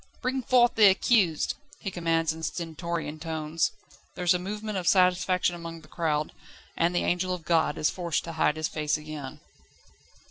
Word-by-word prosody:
"Bring 260 +1 -1
forth 245 -1 +4
the 215 -2 +7
accused!" 190 -4 +3 0.2
he 195 - -5
commands 165 -2 0
in 160 - -9
stentorian 165 -1 -4
tones. 160 0 -1 0.4
There 180 - -4
is 175 - +5
a 180 - 0
movement 210 +2 -4
of 175 - -5
satisfaction 180 -1 +3
among 165 -1 -8
the 155 - -17
crowd, 155 -2 -1 0.4
and 170 +1 +1
the - - +2
angel 180 +1 0
of 165 -3 -11
God 160 -2 +2
is 150 - +1
forced 170 -4 -2
to 165 - -6
hide 160 -2 +1
his 155 0 -1
face 150 -1 -1
again. 150 -3 -8
170 Hz, 175 wpm, -27 LUFS, 160-185 Hz, 0.4 s, the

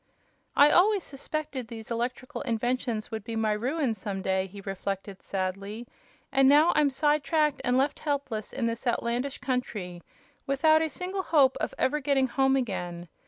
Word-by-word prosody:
"I 290 +1 +7
always 395 +1 +4
suspected 280 -2 -4
these 225 -1 -8
electrical 245 +2 -3
inventions 240 -2 -2
would 220 -2 -4
be 225 +1 -5
my 220 -1 +1
ruin 255 +4 0
some 195 -2 -5
day," 190 0 0
he 200 +2 -11
reflected, 195 0 -5
sadly; 195 +4 -4 0.5
"and 270 -1 +5
now 300 +4 +6
I'm 295 -2 +4
side 295 +2 +1
tracked 300 0 +1
and 250 +1 +2
left 275 +2 +1
helpless 275 -8 -3
in 235 - -2
this 230 +2 -3
outlandish 240 +3 -1
country, 215 -9 -3 0.5
without 310 +3 +4
a 320 - 0
single 370 +4 -3
hope 280 -7 +4
of - - -3
ever 300 +3 +1
getting 275 -1 +2
home 270 +1 +2
again. 175 -8 -3
250 Hz, 165 wpm, -28 LUFS, 215-285 Hz, 0.5 s, I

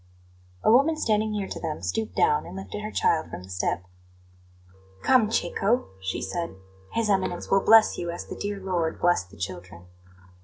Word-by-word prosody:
A - - +5
woman 285 +7 +5
standing 215 -5 +1
near 205 -2 -2
to - - -6
them 160 -2 -4
stooped 220 -1 -2
down 445 +1 +2
and - - -9
lifted 195 +2 -6
her 215 - -4
child 165 -6 +1
from 90 - -7
the 95 - -12
step. 90 -1 -1 1.2
"Come, 250 -5 +4
Cecco," 225 +1 0
she 95 0 -3
said. 170 - -3 0.4
"His 230 -1 +1
Eminence 190 -3 0
will 195 - +5
bless 225 -1 +6
you 175 - -3
as 170 - -5
the - - -7
dear 205 -1 -4
Lord 180 -4 -1
blessed 175 - +2
the 100 - -16
children." 90 -2 -7
195 Hz, 180 wpm, -26 LUFS, 160-220 Hz, 1.2 s, bless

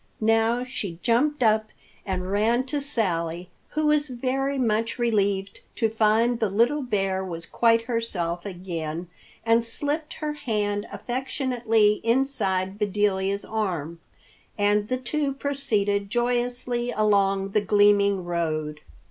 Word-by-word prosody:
Now 225 +2 +2
she 205 -9 -4
jumped 255 +4 +2
up 220 -1 +3 0.4
and 185 -1 -2
ran 225 +5 +2
to 285 +2 -2
Sally, 180 - -1 0.2
who 310 0 -1
was 300 -1 +2
very 270 +2 -1
much 230 -2 0
relieved 200 -5 0
to 225 -3 +1
find 225 +2 +2
the 220 -4 +1
little 235 +9 +2
bear 195 -6 -1
was 170 -2 -6
quite 230 -1 +3
herself 195 -8 -2
again, 175 -3 -5 0.4
and 230 0 +4
slipped 290 +6 -3
her 300 -1 -3
hand 210 -7 -2
affectionately 240 -4 0
inside 210 -6 0
Bedelia's 200 -1 0
arm. 175 -7 -3 0.6
And 205 0 +2
the 255 - -1
two 275 +2 -2
proceeded 210 -8 0
joyously 245 +1 -1
along 200 -3 +2
the 210 +2 +1
gleaming 205 -2 +3
road. 155 -3 -2
215 Hz, 125 wpm, -25 LUFS, 195-245 Hz, 0.6 s, and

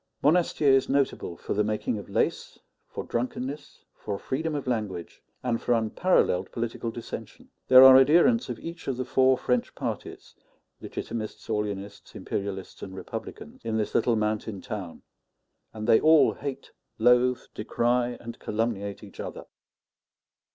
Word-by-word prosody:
Monastier 155 -2 +3
is 135 0 +3
notable 135 -10 0
for - - -4
the 105 - +2
making 105 +1 -2
of 100 - -11
lace, - - -1 0.3
for - - -6
drunkenness, 130 +4 -4
for 100 -2 -5
freedom 155 +7 -3
of 145 - -3
language, 105 -9 -4 0.2
and 120 -2 -1
for 120 - +1
unparalleled 115 - +1
political 115 0 -3
dissension. 115 0 -8 0.2
There 130 0 +9
are 130 0 +10
adherents 175 - +4
of - - -4
each 165 0 -8
of 135 -3 -1
the 130 - -2
four 130 +1 +3
French 125 -1 -1
parties - - -6 0.5
Legitimists, 110 -2 -6
Orleanists, 100 -2 -4
Imperialists, 95 -2 -5
and 95 -1 -7
Republicans - - -8
in 110 -1 -1
this 110 - -2
little 120 - +2
mountain 105 -1 -2
town; 100 -7 -7 0.7
and 110 -1 -6
they 110 - +6
all 155 0 +6
hate, 140 -1 -6 0.3
loathe, 125 +2 +4
decry, 120 +2 0
and 115 0 -9
calumniate 105 -2 -3
each - - -13
other. - - -6
120 Hz, 145 wpm, -27 LUFS, 105-130 Hz, 0.7 s, are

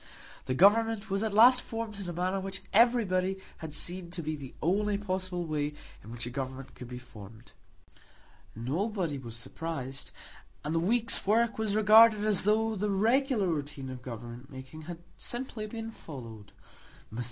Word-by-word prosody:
The 130 - 0
Government 220 +4 +4
was 195 +1 +1
at 220 -1 0
last 245 +5 +7
formed 225 -2 -5
in 190 -3 -5
a - - -4
manner 185 +3 0
which 190 0 -4
everybody 195 -5 +3 0.2
had 160 -1 -6
seen 175 +4 -2
to 170 -1 -4
be 155 +1 -2
the 135 -3 -9
only 200 +5 +1
possible 185 -3 -2
way 150 -2 -2 0.3
in 110 - -11
which 120 0 -4
a 120 - -5
government 130 0 -5
could 125 - -9
be 125 0 -7
formed. 115 -2 -13 1.0
Nobody 165 - -1
was 115 -3 -7
surprised, 135 +2 -5 0.5
and 150 - -2
the 165 - +2
week's 230 +4 +1
work 230 +2 +3
was 215 -2 0
regarded 215 0 +7
as 205 -3 +2
though 220 +1 +2
the 210 +1 -1
regular 230 +3 +2
routine 145 -5 -3
of 125 -1 -8
government 120 +1 -8
making 130 +4 -9
had 170 0 -7
simply 240 -3 -5
been 225 +1 -6
followed. 115 - -10 0.6
Mr. 115 - -5
185 Hz, 165 wpm, -30 LUFS, 135-215 Hz, 1.0 s, last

